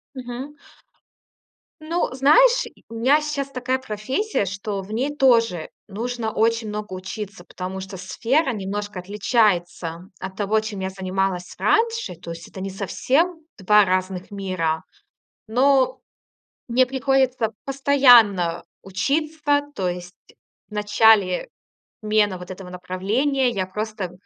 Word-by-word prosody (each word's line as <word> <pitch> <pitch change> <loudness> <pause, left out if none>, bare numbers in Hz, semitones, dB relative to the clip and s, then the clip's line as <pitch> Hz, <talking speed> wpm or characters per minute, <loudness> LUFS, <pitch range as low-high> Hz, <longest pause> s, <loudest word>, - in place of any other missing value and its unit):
Мгм. 255 +3 -7 1.3
Ну, 330 +3 -1
знаешь, - - +5
и - - -15
э, - - -30
у 230 - -10
меня 260 +7 +3
сейчас 295 -2 -3
такая 255 0 -1
профессия, 260 - -2
что 200 +1 -4
в 195 +3 -10
ней 265 +6 -1
тоже 230 - +3 0.2
нужно 225 +2 -3
очень 230 0 +1
много 210 -1 -5
учиться, 190 0 -7
потому 185 +1 -6
что 190 +1 -7
сфера 250 - 0
немножко 205 -1 -4
отличается 185 -4 0
от 190 0 -6
того, 210 +1 +1
чем 215 -2 -6
я 190 0 -2
занималась 190 -1 -2
раньше. 450 - +1
То 170 0 -10
есть 165 0 -8
это 190 - -10
не 195 +1 -4
совсем 300 - 0
2 210 +2 +5
разных 185 0 -2
мира. 185 -5 -2 0.7
Но 260 +3 +3 0.7
мне 250 +2 +4
приходится 260 -2 +1
постоянно 245 -11 +5 0.2
учиться. 290 +8 0
То 185 -6 -1
есть 180 0 -6 0.5
в - - -22
начале 210 -2 +3 0.6
смены 210 -3 +2
вот 180 +1 -9
этого 185 0 -9
направления 215 +10 0
я 195 -6 -2
просто 210 -1 -4
210 Hz, 130 wpm, -23 LUFS, 190-260 Hz, 1.3 s, знаешь